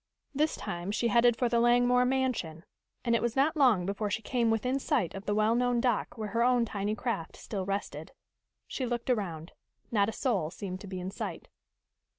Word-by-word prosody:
This 305 +3 +1
time 175 +2 -5
she 230 +3 0
headed 235 +1 +4
for 245 - +2
the 235 0 +2
Langmore 245 +1 +4
mansion, 250 -11 -1 0.4
and 235 - +2
it 230 - +3
was 235 -1 -1
not 280 +5 +2
long 245 - +4
before 200 +2 -2
she 220 +3 -2
came 235 0 +1
within 250 +5 +1
sight 260 - 0
of 195 0 -8
the 205 - +1
well 215 +1 +3
known 245 0 +2
dock 240 -1 0
where 215 -1 -4
her 230 +2 0
own 245 -1 +3
tiny 205 0 -2
craft 220 -9 -3
still 195 -3 -5
rested. 200 +1 -4 0.5
She 255 - -3
looked 240 +1 -1
around. 175 -8 -3 0.4
Not 205 -2 +3
a - - -2
soul 210 - 0
seemed 185 +1 -6
to 205 - -9
be 185 -1 -5
in 180 +1 -5
sight. - - -6
230 Hz, 200 wpm, -30 LUFS, 200-245 Hz, 0.5 s, headed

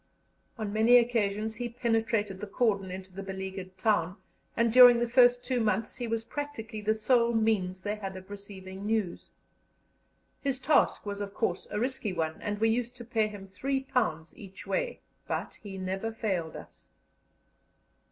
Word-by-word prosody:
On 215 -3 -3
many 225 +3 +6
occasions 220 -2 +1
he 245 -1 -3
penetrated 225 -4 0
the 210 - -4
cordon 200 -3 +1
into 185 0 -8
the 195 - -6
beleaguered 190 -1 -6
town, 185 -3 +1 0.4
and 230 -1 +2
during 245 -1 +10
the 240 0 +1
first 245 0 +5
two 255 -1 0
months 220 -1 0
he 245 -2 -3
was 225 0 -1
practically 230 -5 -5
the 215 +1 +1
sole 235 +1 +3
means 190 -5 +1
they 210 +1 -2
had 195 -2 -6
of 185 +2 -12
receiving 195 -1 -9
news. 215 -5 -1 1.1
His 275 -2 0
task 285 -2 +2
was 205 0 -4
of 200 -1 -5
course - - -1
a - - -2
risky 245 -4 -2
one, 160 -2 -2
and 205 0 -2
we 225 +2 +3
used 240 +2 -1
to 240 - -10
pay 220 -2 +1
him 205 -2 -9
£3 250 - -1
each 195 -1 -11
way, - - -2 0.3
but - - -4
he 200 -3 -8
never 190 +4 -3
failed 190 -8 -2
us. - - -12
215 Hz, 165 wpm, -29 LUFS, 195-235 Hz, 1.1 s, during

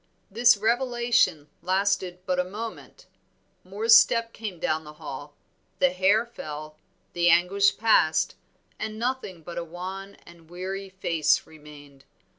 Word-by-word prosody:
This 235 +1 +5
revelation 235 - +1
lasted 185 -1 0
but 180 -1 0
a - - +3
moment, 215 +5 -8 0.6
Moor's 210 +5 +4
step 230 -1 +4
came 205 -6 -7
down 155 0 -1
the 150 0 -11
hall, 145 -2 -9 0.4
the 180 - +3
hair 195 +5 +2
fell, 155 -9 -8 0.4
the 175 0 +3
anguish 180 +4 +3
passed, 205 -8 +3 0.5
and 215 0 -5
nothing 230 -8 -3
but 175 +1 -6
a - - -4
wan 185 +4 -8
and 170 -2 -17
weary 190 +2 -6
face 170 -5 +1
remained. 145 -3 -15
185 Hz, 130 wpm, -26 LUFS, 160-215 Hz, 0.6 s, This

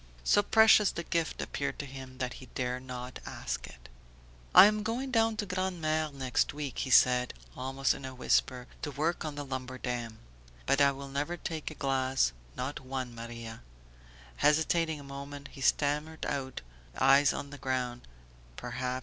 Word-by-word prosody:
So 205 - +5
precious 220 -1 +6
the 170 - -4
gift 165 -1 -1
appeared 140 - -3
to 145 - -5
him 130 -1 -9
that 125 -1 -2
he 130 - -11
dared 125 0 -2
not 125 -1 -7
ask - - -5
it. - - -14 0.7
"I - - +12
am 210 +1 +3
going 240 +5 -2
down 225 -2 +2
to 210 - -1
Grand'Mere 175 -5 -1
next 135 0 0
week," 145 -3 -4
he 135 - -2
said, 125 0 +5 0.2
almost 135 +1 0
in - - -9
a 130 0 -6
whisper, 125 0 +1 0.2
"to 150 - -3
work 155 +4 -1
on 155 -2 -4
the 145 0 -5
lumber 130 -1 -5
dam. 120 -3 -4 0.5
But 140 - +3
I 140 0 +6
will 140 0 -7
never 145 +5 -2
take 160 -3 -4
a 155 - -9
glass, 130 - +1 0.2
not 130 +3 -3
one, 130 -2 -5
Maria!" 115 -1 -8 0.8
Hesitating 160 - +2
a - - -10
moment 140 +1 -8
he 135 - -11
stammered 150 +3 +1
out, 135 -2 -3 0.4
eyes 135 +1 +6
on 140 0 -5
the 145 - -9
ground: 125 -2 -2 0.5
"Perhaps 125 - -3
135 Hz, 170 wpm, -31 LUFS, 130-155 Hz, 0.8 s, I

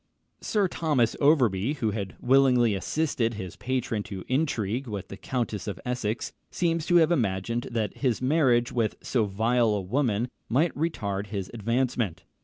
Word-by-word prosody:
Sir 205 -3 +1
Thomas 150 -10 +1
Overbury, 130 -6 +3
who 115 -7 -1
had 100 -3 -4
willingly 125 -3 +4
assisted 120 +1 -1
his 95 -4 -6
patron 125 -4 -2
to 95 -2 -6
intrigue 130 -4 -1
with 100 -4 -5
the - - -7
Countess 110 -3 -3
of 100 -4 -4
Essex, 125 -3 -2 0.2
seems 165 -2 0
to 175 - +3
have 165 -1 +5
imagined 115 - 0
that 110 -4 -2
his 125 -5 0
marriage 130 -4 +3
with 115 -3 0
so 115 -5 +1
vile 110 +2 +2
a 100 - -1
woman 120 +2 0 0.2
might 150 +8 +2
retard 105 -11 -2
his 100 -2 -4
advancement. 115 -5 -1
120 Hz, 155 wpm, -27 LUFS, 105-135 Hz, 0.2 s, have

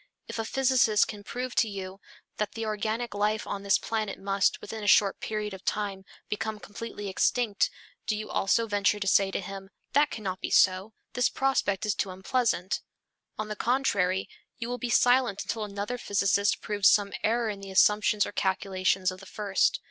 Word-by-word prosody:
If - - -5
a 225 - -1
physicist 255 -5 +3
can 210 -2 -8
prove 250 +3 -4
to 225 - +2
you 195 -1 -7 0.4
that 210 -2 -2
the 225 0 -4
organic 220 +2 -2
life 210 +1 0
of 200 - -4
this 200 -1 +3
planet 220 -2 -3
must, 195 0 +1
within 220 -1 -7
a - - -3
short 200 -1 +5
period 210 -1 -3
of 190 0 -9
time, 200 -2 -2 0.2
become 215 0 -3
completely 205 0 -7
extinct, 205 +2 +1 0.4
do 215 - 0
you 215 - -5
also 230 +4 +2
venture 205 -1 +1
to 200 - -3
say 195 0 +4
to - - -2
him, 195 0 -8 0.2
"That 290 +2 +4
cannot 190 -4 -5
be - - -3
so. 190 +3 +3 0.2
This 245 -1 +2
prospect 220 -7 0
is 210 - +1
too 195 - -2
unpleasant." 190 0 -1 0.6
On 215 - -3
the 215 - -4
contrary, 200 -7 +1 0.3
you 235 -1 -5
will 245 0 -3
be 245 - -3
silent 245 -4 +3
until 225 -2 -3
another 205 +4 -4
physicist 200 -1 +1
proves 205 -2 +4
some 205 -1 +2
error 235 +1 +1
in 205 -2 -5
the 195 0 -9
assumptions 210 +2 +4
or - - -6
calculations 190 -1 0
of 185 - -10
the 195 - -13
first. 200 -1 +1
205 Hz, 185 wpm, -28 LUFS, 195-225 Hz, 0.6 s, short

